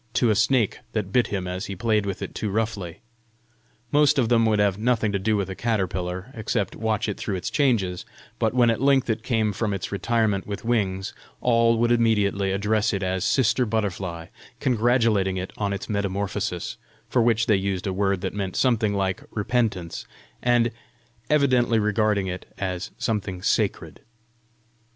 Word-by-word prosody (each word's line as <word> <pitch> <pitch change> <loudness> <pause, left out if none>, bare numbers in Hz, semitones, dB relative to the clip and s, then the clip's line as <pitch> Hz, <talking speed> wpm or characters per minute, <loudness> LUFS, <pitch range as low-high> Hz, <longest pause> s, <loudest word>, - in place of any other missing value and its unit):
to 120 -3 +3
a - - +2
snake 110 +1 +2
that 105 -4 -2
bit 125 +3 +3
him 95 -3 -3
as 90 +4 -4
he 100 - -5
played 105 +1 +1
with 95 - -4
it - - -6
too 105 - -3
roughly. 100 -5 -3 0.9
Most 150 0 +4
of 120 -4 +2
them 115 -2 +4
would 110 -1 +2
have 100 -1 +2
nothing 115 -2 +1
to 100 - -1
do 105 +2 +1
with 100 -2 -1
a 95 - -5
caterpillar, 95 -1 -2
except 110 -2 -2
watch 110 -1 -1
it 105 - -3
through 100 - -3
its 90 - -4
changes; 115 -11 +1 0.4
but - - +2
when 120 -2 +4
at 115 - -2
length 135 -3 +3
it 110 0 -2
came 110 -3 0
from 105 0 -1
its 95 -1 -5
retirement 105 -1 0
with 100 +2 -5
wings, 95 -5 0 0.3
all 115 -1 +3
would 120 +1 +2
immediately 105 -4 +2
address 105 +2 +1
it 100 - -2
as 95 0 -1
Sister 125 +2 +2
Butterfly, 100 -7 -2 0.3
congratulating 115 -6 +2
it 95 +1 -5
on 100 -1 0
its 100 -1 -4
metamorphosis 100 -2 -2 0.3
for 125 - +2
which 115 -1 +3
they 105 - +4
used 95 -1 -2
a 95 - -1
word 100 -1 0
that 95 - -3
meant 100 -2 -3
something 115 -5 +2
like 95 -1 -1
REPENTANCE 105 -6 -1 0.3
and 120 -1 +3 0.6
evidently 130 -6 +3
regarding 105 -1 +1
it 90 -1 -6
as 95 +1 -3
something 100 -4 -2
sacred. - - -1
105 Hz, 175 wpm, -24 LUFS, 95-115 Hz, 0.9 s, Most